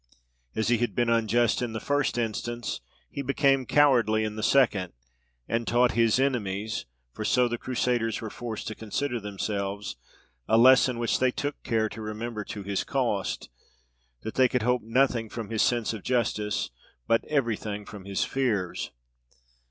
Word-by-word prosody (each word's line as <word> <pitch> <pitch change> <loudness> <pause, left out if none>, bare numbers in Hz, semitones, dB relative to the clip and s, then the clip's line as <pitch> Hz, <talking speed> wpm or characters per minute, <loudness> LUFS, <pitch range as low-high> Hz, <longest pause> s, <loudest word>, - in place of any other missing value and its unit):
As 110 +1 0
he 120 -2 +3
had 120 - -1
been 120 -1 +2
unjust 115 +1 +2
in 120 -2 -2
the 110 - -3
first 145 -1 0
instance, 120 - -3 0.3
he 140 - -4
became 135 -1 +2
cowardly 120 -7 +4
in 105 -1 -3
the 110 - -4
second, 105 -7 +3 0.5
and 115 0 -1
taught 120 0 +4
his 115 +1 +3
enemies 110 - -1 0.3
(for - - -5
so 125 -1 +3
the 120 -1 -3
Crusaders 120 -3 0
were 110 -2 -6
forced 115 -3 -5
to - - -4
consider 120 +4 -2
themselves) 100 - -3 0.5
a 110 - +4
lesson 130 0 +6
which 120 0 0
they 130 - +4
took 145 +3 -4
care 110 -2 +1
to 110 - -8
remember 110 +1 -4
to 105 - -6
his 100 0 -1
cost, - - -1 0.7
that 110 - -4
they 130 -1 +5
could 125 -2 -1
hope 125 +1 +2
nothing 115 0 +1
from 115 -1 -6
his 110 - +1
sense 120 -2 +1
of 110 - -6
justice, 110 -4 0 0.3
but 115 - +2
every 130 -7 +1
thing 105 -1 -6
from 100 -2 -10
his 100 -1 -1
fears. 110 -10 -1
115 Hz, 165 wpm, -27 LUFS, 110-125 Hz, 0.7 s, lesson